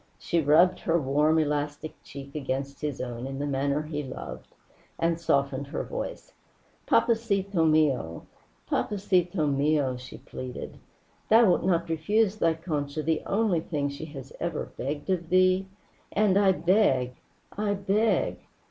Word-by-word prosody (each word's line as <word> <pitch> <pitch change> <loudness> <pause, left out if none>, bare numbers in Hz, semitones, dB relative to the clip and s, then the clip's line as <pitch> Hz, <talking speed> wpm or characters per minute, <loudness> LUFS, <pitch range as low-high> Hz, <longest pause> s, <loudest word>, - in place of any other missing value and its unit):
She 170 - 0
rubbed 160 +5 +4
her 170 0 +1
warm 150 +3 +2
elastic 150 0 -1
cheek 140 0 -10
against 135 -1 -4
his 150 -3 -3
own 120 0 -4
in 135 0 -5
the 145 - -2
manner 140 +1 0
he 150 -1 -4
loved, 65 - -8 0.5
and 165 0 0
softened 140 -3 0
her - - -3
voice. - - -6 0.5
"Papacito 200 -6 +2
mio, 135 - +1 0.4
papacito 185 -4 +1
mio," 140 -2 +1
she 125 +1 -10
pleaded. 130 -1 -8 0.5
"Thou 230 +2 +7
wilt - - +1
not 170 -2 +1
refuse 200 +6 +1
thy 165 -5 +2
Concha 155 -3 -3
the 160 0 0
only 200 -4 +2
thing 145 -3 -2
she 140 +3 -7
has 140 -3 -10
ever 170 -2 -3
begged 145 +7 -3
of 170 -3 -1
thee. 185 +1 +3 0.4
And 205 -2 +3
I 200 -1 +5
beg! 170 - +2 0.4
I 205 0 0
beg! 200 +3 +1
155 Hz, 140 wpm, -27 LUFS, 140-185 Hz, 0.5 s, Thou